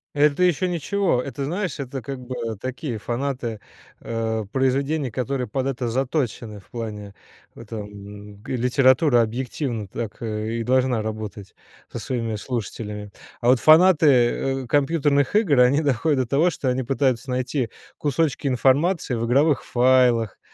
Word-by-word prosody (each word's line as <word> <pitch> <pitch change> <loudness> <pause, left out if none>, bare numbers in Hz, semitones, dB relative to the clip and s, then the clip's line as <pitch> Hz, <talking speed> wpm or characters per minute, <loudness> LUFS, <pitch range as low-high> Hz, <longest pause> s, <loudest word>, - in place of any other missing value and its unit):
Это 150 +3 +3
еще 180 +1 +2
ничего. 175 -3 0
Это, 140 +2 -5
знаешь, 180 +6 -3
это 135 -1 -5
как 135 0 -6
бы 130 +1 -5 0.3
такие 130 -1 -4
фанаты, 120 -2 -3 0.4
а, 110 -1 -3
произведений, 135 +4 0
которые 130 +2 -2
под 130 -1 -2
это 130 -3 -2
заточены 125 -4 -2
в - - -27
плане 105 -4 -6 0.4
этом. 105 -2 -9
Г 130 - -4
литература, 125 +2 +4
объективно, 115 -1 -3
так 115 +5 -6
и 110 +1 -3
должна 125 -1 +2
работать 105 -2 -6 0.4
со - - -5
своими 115 -4 -3
слушателями. 105 -3 -5 0.3
А 120 - +2
вот 130 - +5
фанаты, 160 +2 +6 0.6
э, - - -10
компьютерных 145 - +1
игр- 180 - +3
они 125 +4 +5
доходят 145 0 +1
до - - -1
того, 150 +8 +3
что 140 -5 -2
они 130 +1 0
пытаются 130 -1 0
найти 125 0 -1 0.3
кусочки 145 -1 0
информации 135 +4 +2
в 115 0 -2
игровых 140 +4 +2
файлах, 125 -3 +3
130 Hz, 140 wpm, -23 LUFS, 115-140 Hz, 0.6 s, фанаты